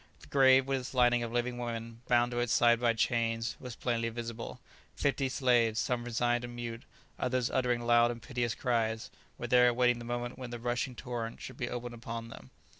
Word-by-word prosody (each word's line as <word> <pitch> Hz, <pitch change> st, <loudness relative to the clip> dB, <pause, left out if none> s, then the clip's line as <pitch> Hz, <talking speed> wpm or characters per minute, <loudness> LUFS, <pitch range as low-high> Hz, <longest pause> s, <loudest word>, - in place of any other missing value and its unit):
The -, -, -14 dB
grave, 135 Hz, -1 st, +6 dB
with 135 Hz, 0 st, 0 dB
its 130 Hz, +1 st, -8 dB
lining 120 Hz, -1 st, +4 dB
of 115 Hz, -1 st, -3 dB
living 120 Hz, +1 st, -1 dB
women, 115 Hz, -1 st, -5 dB
bound 120 Hz, 0 st, +3 dB
to 120 Hz, -, -1 dB
its 120 Hz, -1 st, 0 dB
side 120 Hz, -1 st, +5 dB
by 120 Hz, -1 st, +3 dB
chains, 115 Hz, 0 st, 0 dB
was 125 Hz, -3 st, -7 dB
plainly 115 Hz, -2 st, -1 dB
visible; 115 Hz, +1 st, -6 dB, 0.4 s
fifty 140 Hz, -1 st, 0 dB
slaves, 120 Hz, -4 st, +2 dB
some 120 Hz, -1 st, -1 dB
resigned 120 Hz, +1 st, 0 dB
and 120 Hz, 0 st, -7 dB
mute, 120 Hz, 0 st, -6 dB, 0.3 s
others 125 Hz, -1 st, 0 dB
uttering 125 Hz, -2 st, +1 dB
loud 120 Hz, 0 st, +4 dB
and 120 Hz, -1 st, -4 dB
piteous 120 Hz, -1 st, -2 dB
cries, 115 Hz, -1 st, -1 dB, 0.3 s
were -, -, -5 dB
there 125 Hz, 0 st, +5 dB
awaiting 120 Hz, 0 st, +3 dB
the 120 Hz, -, -8 dB
moment 120 Hz, +1 st, -4 dB
when 125 Hz, -2 st, -6 dB
the 120 Hz, -, -5 dB
rushing 120 Hz, +2 st, -2 dB
torrent 120 Hz, -3 st, -5 dB
should -, -, -8 dB
be 120 Hz, -, -3 dB
opened 120 Hz, 0 st, -5 dB
upon 115 Hz, 0 st, -6 dB
them. 65 Hz, -, -12 dB
120 Hz, 200 wpm, -31 LUFS, 115-125 Hz, 0.4 s, grave